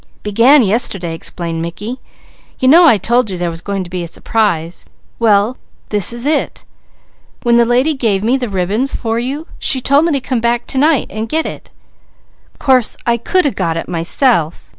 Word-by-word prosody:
"Began 235 +7 +4
yesterday," 195 -5 +2
explained 165 0 -5
Mickey. 205 +9 -6 0.6
"You 260 - +1
know 335 +5 +7
I 230 - +5
told 235 +3 +1
you 185 - -4
there 175 -1 -2
was 165 0 -8
going 195 0 -3
to 175 - -11
be 180 -1 -3
a 170 - -5
surprise. 175 -3 -2 0.3
Well 220 +1 +2 0.3
this 205 -1 0
is 235 +2 -2
it. 300 0 -1 0.8
When 235 -1 +3
the 235 - +4
lady 250 +6 +1
gave 220 -8 -1
me 240 +4 +2
the 250 -4 -3
ribbons 200 +8 -1
for 225 -1 -2
you, 275 +6 -4
she 265 - +3
told 280 +5 +3
me 335 - 0
to 280 - 0
come 255 -2 -3
back 235 +1 0
to 265 - -1
night, 300 -1 +2
and 220 +1 -5
get 320 +4 0
it. - - -8 0.9
Course 260 -5 +1
I 235 0 +1
could 365 +10 0
a 285 - +2
got 170 -5 -2
it - - -5
myself. 170 - 0
230 Hz, 190 wpm, -15 LUFS, 190-260 Hz, 0.9 s, know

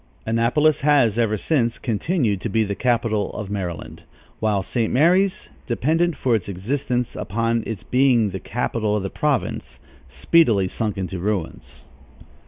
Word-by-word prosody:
Annapolis 120 +8 +2
has, 135 -7 +3
ever 110 -2 +1
since, 120 - 0
continued 115 - -1
to 115 - -3
be 110 +2 +2
the 100 -1 -2
capital 115 -2 0
of 105 -2 -6
Maryland, 90 -5 -5 0.4
while 105 -3 +1
St. 115 +3 -1
Mary's, 180 +7 +2 0.2
dependent 160 +7 +1
for 125 - +1
its 105 -4 -1
existence 120 +5 -2
upon 115 +2 -1
its 110 -4 -5
being 125 -5 +3
the 95 - -5
capital 110 -1 -2
of 105 - -1
the 95 - -4
province, 150 -4 -2 0.3
speedily 105 - +3
sunk 105 +2 -3
into 95 -1 -4
ruins. 100 -2 -4
115 Hz, 145 wpm, -22 LUFS, 100-130 Hz, 0.4 s, has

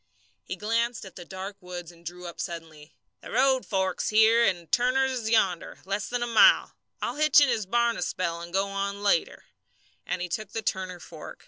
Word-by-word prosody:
He 185 - -5
glanced 230 +3 -1
at 190 - -12
the 175 - -9
dark 190 +2 -7
woods 175 -1 -8
and 170 0 -20
drew 175 +2 -8
up 170 - -6
suddenly. 160 -2 -8 0.3
"The - - -10
road 265 0 +2
forks 190 -2 0
here, 220 +2 +5
and 175 -6 0
Turner's 260 +2 +2
is 235 -4 -3
yonder 190 -6 +1
less 195 +1 -2
than 245 0 -1
a - - 0
mile. 240 - +5 0.3
I'll - - -2
hitch 305 0 +6
in 285 -2 +4
his 220 -5 -1
barn 235 +2 +2
a - - -5
spell 170 -2 -2
and 170 0 -8
go 195 +2 0
on 200 +1 -3
later," 200 -5 +1 0.6
and - - -1
he 180 - -3
took 210 +4 -5
the 225 - -3
Turner 185 -2 -3
fork. 160 -2 -10
195 Hz, 205 wpm, -27 LUFS, 175-235 Hz, 0.6 s, hitch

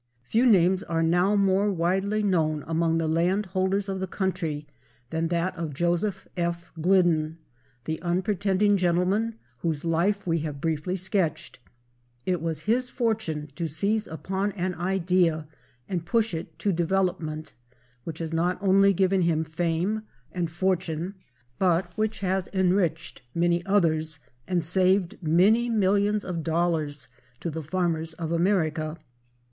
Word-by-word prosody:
Few 225 - +2
names 185 -3 +4
are 165 -5 -1
now 175 +5 +3
more 200 +1 +3
widely 190 +4 0
known 155 -6 +1
among 165 0 +1
the 165 - 0
land 175 +6 +1
holders 190 +2 0
of 190 -1 -3
the 190 - -2
country 165 -6 -2 0.5
than 165 0 0
that 175 +2 -1
of 165 -5 -4
Joseph 175 +4 0
F. 170 -1 -2
Glidden, 165 -3 +3 0.5
the 160 0 -3
unpretending 195 +2 +1
gentleman 185 +5 +1 0.2
whose 160 -2 -2
life 175 +5 +1
we 165 -2 +1
have 150 -2 -4
briefly 160 +3 -1
sketched. 185 -6 -1 0.7
It 180 -3 0
was 160 -2 -2
his 245 +6 +1
fortune 215 - -2
to 170 0 -2
seize 200 +8 0
upon 190 +5 -2
an 185 -1 -2
idea, 175 -3 +1 0.4
and 175 -3 -2
push 225 +2 +1
it 160 -1 -6
to 200 +4 0
development, 170 -3 -1 0.5
which 160 +2 -6
has 165 -1 -4
not 175 +3 +1
only 195 0 +4
given 190 +1 +2
him 165 -2 +2
fame 170 +6 -1 0.3
and 175 -2 -2
fortune, 180 0 -1 0.5
but 180 -1 +1
which 215 0 -1
has 190 -1 0
enriched 180 -3 +1
many 170 +1 +2
others 160 -5 +2 0.3
and 175 -3 0
saved 185 +1 +2
many 195 +9 +4
millions 205 -1 +2
of 175 -3 -3
dollars 160 -3 0 0.3
to 170 - -3
the 160 +1 -4
farmers 165 0 -1
of 160 0 -5
America. 165 -3 +1
175 Hz, 140 wpm, -26 LUFS, 165-195 Hz, 0.7 s, names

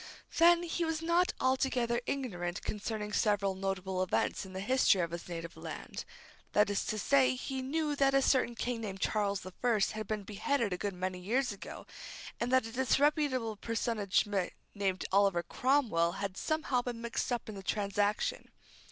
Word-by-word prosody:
Then, 340 +1 +7
he 345 0 -1
was 325 -1 -1
not 340 +2 +3
altogether 255 -2 +1
ignorant 175 -11 -3
concerning 210 0 -3
several 205 -2 +2
notable 190 -1 -2
events 185 +1 0
in 190 - -11
the 190 - -4
history 250 -2 +4
of 170 -1 -2
his 170 +1 -6
native 170 -1 -6
land. - - -7 0.5
That 210 -1 +4
is 200 - 0
to 215 - -2
say, 135 -9 +4
he 265 - -4
knew 295 +3 -1
that 275 -1 +3
a 275 - +5
certain 250 -3 +2
king 240 0 -2
named 195 -3 -5
Charles 200 -1 0
the 185 - -8
First 230 -5 +2
had 215 -1 -5
been 215 -2 -2
beheaded 210 +2 -1
a - - -2
good 200 -2 -2
many 185 0 -3
years 240 +8 0
ago, 200 - -8 0.5
and 240 +1 -1
that 260 -2 +4
a 225 - -6
disreputable 265 -2 +2
personage 225 -3 0 0.5
named 195 -2 -1
Oliver 195 -3 +3
Cromwell 230 -13 +2
had 195 -1 -4
somehow 295 -1 0
been 245 -1 -5
mixed 235 +2 -2
up 240 -1 -2
in 215 - -6
the 195 - -7
transaction. 205 +1 0
215 Hz, 175 wpm, -32 LUFS, 195-260 Hz, 0.5 s, Then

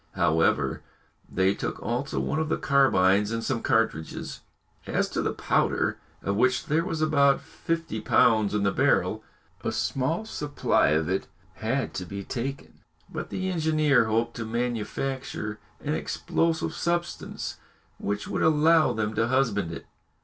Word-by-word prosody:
However, 80 -1 +2 0.5
they 95 +1 +3
took - - -4
also 125 +5 -2
one 155 - -1
of 160 -1 -1
the - - +1
carbines 105 -8 +4
and 115 0 -2
some 115 - -1
cartridges. 115 - -1 0.5
As - - +1
to - - -1
the - - 0
powder, - - 0 0.2
of 100 - 0
which 125 +2 +2
there 160 +3 +1
was 160 -3 -2
about 140 -3 +4
fifty 165 -10 -4
pounds 110 -2 +3
in 105 - +1
the 100 - +3
barrel, - - +2 0.4
a - - 0
small 150 +10 -1
supply 150 -8 +1
of 75 +1 +2
it 95 +1 -1 0.3
had 130 +5 -2
to 90 - -4
be 100 +2 -6
taken, 135 +6 -5 0.3
but - - -5
the 190 0 -2
engineer 155 -6 +3
hoped 115 +2 0
to 115 - -3
manufacture 120 -1 -3 0.2
an 150 - -1
explosive 165 +1 -1
substance 175 0 -3 0.4
which 105 +1 -3
would - - -2
allow 160 +1 +4
them 110 -1 -1
to 115 +1 +1
husband 115 -9 +1
it. 85 - -7
120 Hz, 150 wpm, -27 LUFS, 105-150 Hz, 0.5 s, carbines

